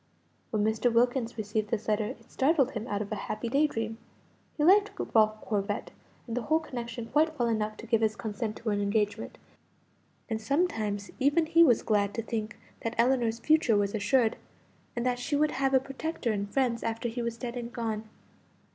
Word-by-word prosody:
When 215 -3 0
Mr. 220 +3 +2
Wilkins 240 0 +1
received 215 0 -2
this 220 -1 -2
letter 215 0 +1
it 255 - -10
startled 270 -1 +3
him 220 +1 -5
out 205 -2 -1
of 205 - -11
a - - 0
happy 220 +2 -2
day 285 +5 +3
dream. 225 -3 -4 0.6
He 295 - +1
liked 405 +5 +6 0.2
Ralph 215 -1 +4
Corbet 205 -1 -2 0.3
and 230 - -4
the 250 - 0
whole 315 +7 +2
connection 240 -6 -6
quite 310 +6 +1
well 240 - +1
enough 215 -2 -1
to - - -9
give 225 -1 +2
his 215 -1 +2
consent 215 0 -4
to 225 -2 -3
an 205 0 0
engagement; 205 0 -1 0.9
and 220 -1 -3
sometimes 220 - -1
even 290 +5 +3
he 335 +1 +6
was 245 -8 +4
glad 205 -1 +1
to 230 - -2
think 220 -1 -4 0.2
that 230 0 -4
Ellinor's 235 -2 +3
future 305 -5 +3
was 200 -1 0
assured, 225 +2 +2 0.6
and 240 0 -2
that 250 -1 +1
she 290 +4 -1
would 300 +1 +2
have 270 0 +1
a - - +7
protector 270 -1 -3
and 200 -1 -2
friends 240 0 +1
after 230 +1 -2
he 240 +1 -3
was 235 -1 -3
dead 240 0 -5
and 240 -1 -5
gone. 220 -2 -3
230 Hz, 195 wpm, -29 LUFS, 215-265 Hz, 0.9 s, a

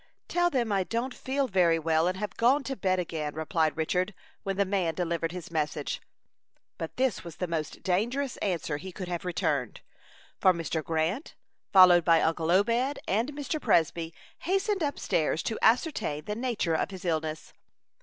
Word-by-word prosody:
"Tell 350 0 +2
them 240 -8 0
I 195 -2 +2
don't 235 +6 -2
feel 270 +1 -1
very 180 -6 +3
well, 160 +1 +2
and 185 +1 -1
have 210 +1 -4
gone 260 +5 +3
to 270 0 -3
bed 185 -4 +1
again," 160 -4 -3
replied 160 0 0
Richard, 180 +5 0 0.3
when 195 -2 -3
the 200 - +3
man 185 -4 0
delivered 170 -1 -1
his 180 -1 -8
message. 150 -2 -2 0.8
But 165 - -5
this 260 -4 +1
was 170 -3 -9
the 180 - -2
most 165 -3 -4
dangerous 240 +9 0
answer 170 -6 -1
he 190 +5 -8
could 185 0 -6
have 175 0 -4
returned; 180 - -1 0.6
for 185 -2 +5
Mr. 165 -2 -3
Grant, 165 - -1 0.4
followed 180 -3 +8
by 165 0 +5
uncle 160 0 0
Obed 230 +9 +2
and 225 +8 +1
Mr. 290 +2 -3
Presby, 165 -5 +2 0.3
hastened 390 +2 0
up 290 -2 -1
stairs 155 0 0
to 225 - -2
ascertain 225 - +2
the 210 - -2
nature 230 -8 -1
of 160 - 0
his 190 -2 -9
illness. 160 -2 -2
185 Hz, 175 wpm, -28 LUFS, 165-235 Hz, 0.8 s, followed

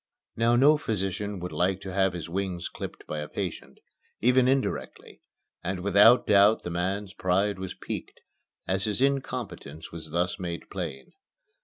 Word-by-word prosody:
Now 115 +1 +3
no 145 +5 +6
physician 100 -3 -2
would 90 - -5
like 95 +2 +1
to 95 -2 -6
have 95 -1 +2
his 85 -2 -5
wings 90 0 -3
clipped - - -8
by 75 - -4
a 75 - -4
patient, - - -5 0.4
even 125 +2 +4
indirectly, 135 0 -2 0.4
and 95 0 -2
without 100 +5 +6
doubt 105 +1 +5
the 90 - -4
man's 95 +3 -2
pride 95 +2 +1
was 95 -1 -5
piqued - - -6 0.5
as 95 +1 0
his 105 +1 0
incompetence 125 - -2
was 80 -1 -8
thus 90 +4 -1
made 85 -2 -5
plain. 80 -8 -6
95 Hz, 155 wpm, -27 LUFS, 90-105 Hz, 0.5 s, no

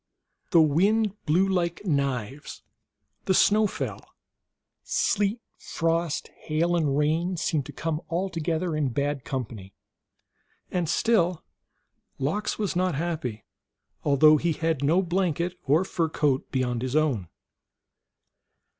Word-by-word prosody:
The 170 -4 +6
wind 200 +8 +2
blew 180 +6 +3
like 175 0 -1
knives; 140 - -2 0.6
the 190 - +2
snow 210 +3 +4
fell; - - -5 0.8
sleet, 205 +3 0 0.2
frost, 165 -1 -1
hail, 165 +3 0
and 145 -5 +1
rain 165 +5 +1
seemed 155 -4 -1
to - - -7
come 160 0 -3
all 175 +4 -1
together 165 -1 -2
in 150 -3 0
bad 140 +1 -2
company, 110 -7 -6 1.0
and 175 -3 -1
still 180 -7 +2 0.7
Lox 160 +11 -1
was 205 -3 -2
not 180 -2 +1
happy, 150 -9 -3 0.6
although 150 +2 +6
he 165 +2 0
had 160 -2 -1
no 170 +7 +3
blanket 175 -1 0
or 155 +6 +4
fur 165 -3 -1
coat 145 -4 0
beyond 125 -3 -1
his 130 +2 -3
own. 140 - +1
160 Hz, 120 wpm, -26 LUFS, 140-180 Hz, 1.0 s, The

